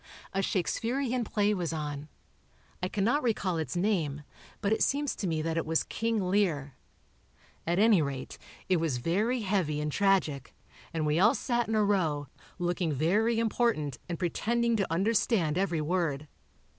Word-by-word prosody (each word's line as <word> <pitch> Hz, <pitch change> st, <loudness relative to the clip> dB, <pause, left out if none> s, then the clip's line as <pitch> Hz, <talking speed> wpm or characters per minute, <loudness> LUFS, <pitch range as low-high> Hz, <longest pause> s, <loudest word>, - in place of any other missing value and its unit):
A 195 Hz, -, 0 dB
Shakesperian 240 Hz, +7 st, -1 dB
play 210 Hz, 0 st, +1 dB
was 175 Hz, -5 st, -2 dB
on; 150 Hz, -2 st, -4 dB, 0.7 s
I 180 Hz, -, 0 dB
cannot 215 Hz, +10 st, +1 dB
recall 200 Hz, -, 0 dB
its 160 Hz, +2 st, -3 dB
name, 170 Hz, -7 st, 0 dB, 0.4 s
but 205 Hz, 0 st, +1 dB
it -, -, -1 dB
seems 285 Hz, 0 st, +1 dB
to 195 Hz, -, -3 dB
me 160 Hz, -2 st, -1 dB
that 165 Hz, 0 st, -1 dB
it 165 Hz, -, +1 dB
was 160 Hz, 0 st, +2 dB
"King 225 Hz, -1 st, -1 dB
Lear." 170 Hz, -8 st, +1 dB, 0.9 s
At 170 Hz, +1 st, +1 dB
any 210 Hz, -3 st, +5 dB
rate, 140 Hz, -3 st, -4 dB, 0.3 s
it 185 Hz, -, +3 dB
was 160 Hz, -6 st, 0 dB
very 210 Hz, -, 0 dB
heavy 185 Hz, -7 st, 0 dB
and 150 Hz, 0 st, -2 dB
tragic, 180 Hz, -9 st, +1 dB, 0.4 s
and 160 Hz, -2 st, -1 dB
we 150 Hz, +2 st, +2 dB
all 215 Hz, +5 st, +5 dB
sat 240 Hz, -2 st, 0 dB
in 220 Hz, -, -1 dB
a 215 Hz, -, +3 dB
row, 165 Hz, -8 st, +1 dB, 0.3 s
looking 175 Hz, -2 st, -1 dB
very 205 Hz, -, +2 dB
important 225 Hz, -, 0 dB
and 170 Hz, -, -2 dB
pretending 235 Hz, +7 st, 0 dB
to 195 Hz, -5 st, -1 dB
understand 190 Hz, -3 st, +2 dB
every 175 Hz, -4 st, 0 dB
word. 155 Hz, -3 st, -1 dB
185 Hz, 160 wpm, -29 LUFS, 155-220 Hz, 0.9 s, any